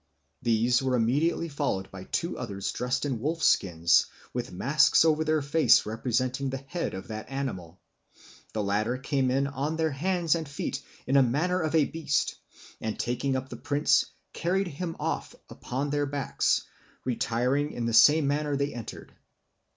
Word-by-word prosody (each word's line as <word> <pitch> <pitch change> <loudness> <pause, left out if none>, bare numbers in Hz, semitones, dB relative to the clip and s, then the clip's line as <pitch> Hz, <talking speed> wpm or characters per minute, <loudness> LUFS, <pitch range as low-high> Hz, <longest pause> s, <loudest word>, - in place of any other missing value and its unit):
These 120 +1 +2
were 130 -1 +1
immediately 145 +9 +1
followed 140 -11 -2
by 95 -1 -9
two 170 - -2
others 100 -6 -4
dressed 125 +3 -1
in 130 -5 -2
wolf 155 +6 -2
skins, 85 -3 +4 0.3
with 120 0 -3
masks 150 - +4
over 160 -1 +3
their 155 -2 +1
faces 155 +3 +4
representing 125 +4 -1
the 135 - -3
head 170 - -3
of 95 +6 -8
that 110 +1 -6
animal. 95 -11 -5 0.7
The 110 - -1
latter 105 +5 0
came 135 0 0
in 135 +2 +2
on 140 +3 -2
their 160 -1 +1
hands 170 +3 +1
and 160 -3 -3
feet 140 - -4 0.2
in 130 - -2
the 140 - +7
manner 160 +9 +1
of 155 0 -1
a 155 -3 +5
beast, 155 -2 -1 0.4
and 110 -1 -3
taking 130 +3 -1
up 130 0 -3
the - - -7
prince, 145 0 +2 0.3
carried 185 +2 0
him 165 +2 -5
off - - -3 0.2
upon 140 +3 -3
their 145 0 0
backs, 140 -1 0 0.4
retiring 125 +4 0
in 120 - -3
the 115 - -1
same 145 +7 +7
manner 145 0 0
they 140 +1 -1
entered." 120 -3 -8
135 Hz, 165 wpm, -28 LUFS, 120-150 Hz, 0.7 s, the